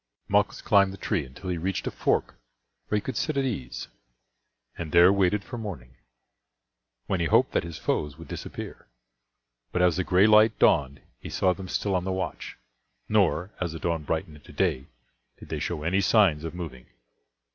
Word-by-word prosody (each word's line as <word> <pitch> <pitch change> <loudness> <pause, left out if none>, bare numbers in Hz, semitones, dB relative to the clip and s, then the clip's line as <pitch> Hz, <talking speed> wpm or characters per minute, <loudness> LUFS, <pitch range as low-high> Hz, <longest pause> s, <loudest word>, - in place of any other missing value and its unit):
Malchus - - +1
climbed 100 -1 +4
the 95 - -9
tree 95 -7 -1
until 80 +8 -7
he 85 - -2
reached 95 +3 -2
a - - -2
fork - - 0 0.5
where 105 - +1
he - - -1
could 130 - -5
sit 155 -3 -1
at 135 - +1
ease, 95 - -4 0.9
and 80 -3 -6
there 85 +3 +7
waited 100 +1 +2
for 120 - -7
morning, 75 - -7 1.1
when 95 - -1
he 85 - +1
hoped - - +4
that - - +1
his 85 -2 -7
foes 75 -2 -2
would - - -11
disappear. - - -8 0.8
But 90 - +1
as 90 -2 +3
the 90 - +1
gray 90 +3 +4
light 110 0 +6
dawned 70 0 +3 0.2
he - - -8
saw 95 -1 +2
them 95 0 -8
still 100 +2 -1
on 90 -1 +1
the 95 - -2
watch; 95 0 -4 0.5
nor, 85 +7 +2
as 85 -3 -2
the 80 - -6
dawn 85 0 -1
brightened 80 0 -3
into 70 - -15
day, 65 +2 0 0.5
did - - -13
they - - -3
show 75 - -3
any 95 +5 +1
signs 95 -7 +4
of 80 +1 -6
moving. 80 -8 -7
90 Hz, 190 wpm, -26 LUFS, 80-100 Hz, 1.1 s, there